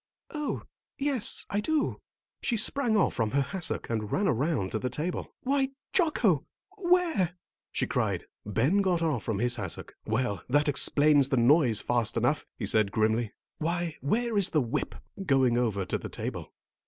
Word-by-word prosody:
"Oh, 300 -2 -3 0.3
yes, 265 -4 0
I 205 - +1
do." 310 +7 -1 0.4
She 235 - 0
sprang 230 +1 +1
off 200 - +2
from 115 -3 0
her 140 +4 +1
hassock 175 +5 -2
and 110 -2 -3
ran 200 +1 +1
around 135 - 0
to 110 - -1
the 125 - -2
table. 155 +8 -4
"Why, 270 0 +1 0.2
Jocko, 240 - +3 0.3
where 350 - +2 0.2
" - - -66
she - - 0
cried. - - -1 0.2
Ben 130 - +2
got 180 -3 +1
off 150 -8 0
from 110 -3 -2
his 120 +3 +1
hassock. 95 -6 -6
"Well, 110 -2 -1
that 145 +3 +3
explains 145 0 +4
the 135 - +1
noise 120 -2 +4
fast 120 -3 0
enough," - - +1
he - - -3
said 110 -2 +2
grimly. 110 +1 +1 0.3
"Why, 170 0 -2
where 220 - +1
is 195 - +5
the 155 - +2
whip?" 120 -1 -3 0.3
going 135 -7 +3
over 110 -6 0
to - - -2
the - - -7
table. - - -6
150 Hz, 170 wpm, -28 LUFS, -, 0.4 s, is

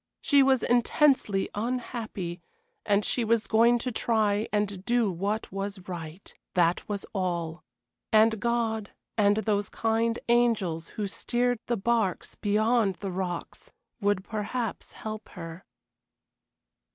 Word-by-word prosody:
She 285 -1 +4
was 265 -2 +4
intensely 245 -4 +3
unhappy, 220 -6 -4 0.5
and 205 0 +3
she 245 - +1
was 225 0 +2
going 235 +2 +4
to 250 +2 -3
try 220 -2 +1
and 205 -3 -1
do 235 -2 +2
what 200 +5 -2
was 195 +1 -4
right. 170 0 -7 0.2
That 175 +2 +2
was 200 -1 -3
all. 175 -4 -2 0.5
And 220 0 +5
God 225 -3 0 0.3
and 205 -2 +4
those 210 -2 0
kind 225 +1 0
angels 220 -9 +2
who 210 - -1
steered 245 +4 0
the 235 - 0
barks 215 -3 0
beyond 215 -1 +2
the 195 +1 -5
rocks 180 -2 -5 0.3
would 205 -2 +1
perhaps 220 +2 -4
help 215 0 -7
her. 165 +1 -8
215 Hz, 125 wpm, -28 LUFS, 195-235 Hz, 0.5 s, And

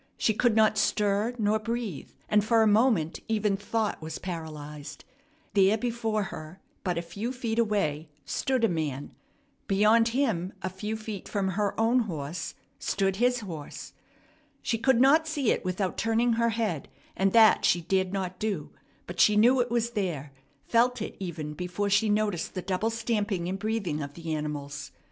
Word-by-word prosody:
She 220 - +2
could 230 +1 +2
not 215 -1 +4
stir 210 +4 +1
nor 215 -1 +2
breathe, 230 - -4 0.2
and 210 -1 +3
for 225 +1 +4
a - - +4
moment 210 -7 +3
even 215 -3 +1
thought 215 +1 -2
was 160 0 -5
paralyzed. 150 -4 -7 0.5
There 200 +1 +4
before 225 -2 -1
her 155 +4 -9 0.2
but 180 -3 -1
a 170 - -1
few 205 +8 -4
feet 235 -3 -2
away 165 -9 0 0.2
stood 255 - -1
a - - +6
man! 150 -6 -3 0.5
Beyond 215 +3 +4
him, 225 -8 0
a 185 - -2
few 210 +4 -4
feet 215 -3 -7
from 195 -2 0
her 200 +2 -1
own 230 +3 +4
horse, 165 - -4 0.2
stood 195 -1 0
his 245 +1 +2
horse. 165 -8 -8 0.7
She 230 - 0
could 235 +1 +3
not 300 +5 +5
see 290 -6 +1
it - - -1
without 185 0 -2
turning 230 +1 +2
her 235 +1 +2
head, 215 -9 -2 0.3
and 195 0 +2
that 225 -2 +6
she 175 - +3
dared 185 +2 0
not 185 -2 -3
do; 200 -8 -2 0.3
but 175 +1 -8
she 210 - +6
knew 245 +5 +5
it 245 - -1
was 235 0 0
there, 170 - -3 0.3
felt 245 +1 +2
it - - -6
even 160 -5 -5
before 180 +4 -2
she 210 +2 +3
noticed 205 -5 0
the 185 - -3
double 195 +4 0
stamping 215 -6 -1
and 190 +2 -3
breathing 200 -8 -2
of 145 0 -6
the 165 -2 -4
animals. 145 -1 -5
205 Hz, 170 wpm, -28 LUFS, 175-225 Hz, 0.7 s, a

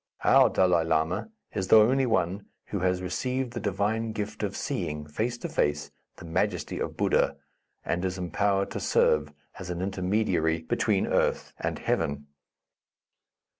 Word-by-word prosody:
Our - - +6
Dalai 90 -3 +3
Lama 80 - 0 0.2
is 95 -2 -2
the 110 - +8
only 130 +5 +4
one 100 -3 0 0.2
who 100 - -2
has 90 0 0
received 125 +7 -2
the 120 - -3
divine 110 +2 -1
gift 105 0 -4
of 100 -2 -2
seeing, 75 0 -3
face 110 +11 -2
to - - -5
face, 75 0 -1 0.2
the - - -11
majesty 80 - -1
of - - -4
Buddha, - - +2 0.5
and 85 +1 -1
is 95 0 -2
empowered 100 +3 0
to - - -3
serve 75 -1 +2 0.3
as 90 -2 -7
an 85 -1 -3
intermediary 90 -4 0
between 80 - +1
earth - - 0
and - - -2
heaven." 70 +1 -1
95 Hz, 150 wpm, -27 LUFS, 85-105 Hz, 0.5 s, the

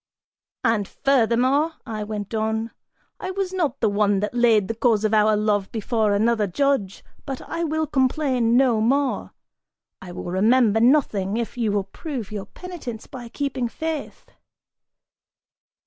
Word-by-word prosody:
("And 225 -5 +1
furthermore," 270 +4 +2
I 215 -3 -4
went 210 0 -5
on), 220 +1 -1 0.5
"I 370 - -4
was 375 0 -3
not 310 -8 -1
the 225 - +3
one 205 -1 +2
that 210 +1 -2
laid 230 -5 +3
the 225 - -2
cause 225 -2 +2
of 215 - +1
our 215 0 +4
love 210 -2 0
before 220 -1 0
another 220 0 +2
judge, 220 -2 0 0.2
but 270 -2 -5
I 335 - -4
will 315 0 0
complain 260 -4 +1
no 250 -5 +3
more, 270 +4 0 0.7
I 180 - -9
will - - -7
remember 220 +3 +3
nothing, 225 -6 +2
if 235 -1 -3
you 230 -4 0
will 200 -1 0
prove 235 - -6
your 200 -2 -5
penitence 305 - -8
by 245 -4 -9
keeping 270 -2 -2
faith." 315 +4 -5
230 Hz, 150 wpm, -23 LUFS, 210-275 Hz, 0.7 s, our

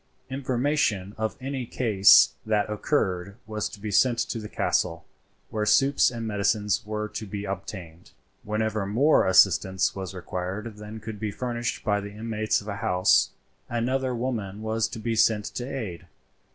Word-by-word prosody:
Information 130 -6 0
of 110 +4 -3
any 135 0 -4
case 105 -7 +6
that 105 -1 +1
occurred 100 -5 -1
was 110 -1 -3
to - - -11
be 105 +1 -5
sent 120 +4 +4
to 115 0 -2
the 105 -1 -7
castle, 85 -2 0 0.5
where 110 -1 -1
soups 135 +6 +4
and 115 -2 -5
medicines 105 -1 0
were 105 0 -2
to 110 0 -6
be 100 +1 -5
obtained. 90 -3 -7 0.3
Whenever 105 -1 -1
more 130 +8 +4
assistance 95 0 +4
was 95 -1 -6
required 95 +5 -5
than 105 +1 -8
could 110 -1 -7
be 110 - -2
furnished 120 +2 -3
by 105 -2 +1
the 100 - -7
inmates 110 0 -1
of 100 - -13
a 100 -1 -4
house, 90 -2 +3 0.4
another 125 +2 0
woman 110 -5 -3
was 110 0 0
to 115 +1 -8
be 115 +1 -2
sent 110 -2 +3
to 120 - -5
aid. 110 - -6
105 Hz, 160 wpm, -26 LUFS, 100-115 Hz, 0.5 s, case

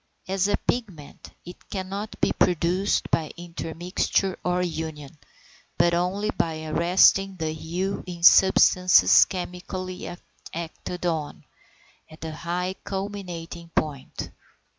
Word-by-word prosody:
As 195 0 +1
a 205 - +2
pigment 190 -12 -4 0.2
it 175 +1 -12
cannot 195 +2 -5
be - - +2
produced 180 +3 +1
by 155 -2 +1
intermixture 175 +2 -2
or 180 0 +1
union, 160 -4 -5 0.6
but 170 - +3
only 190 +5 0
by 160 -1 -2
arresting 185 +4 +4
the 160 -3 -2
hue 180 +5 -3
in 175 -1 -7
substances 185 0 +7
chemically 185 0 -6 0.4
acted 170 +2 -6
on, 160 -4 -2 0.7
at 155 0 -14
the 160 - -5
high 175 +4 -3
culminating 180 -4 -6
point. 140 -4 -3
180 Hz, 110 wpm, -25 LUFS, 165-190 Hz, 0.7 s, substances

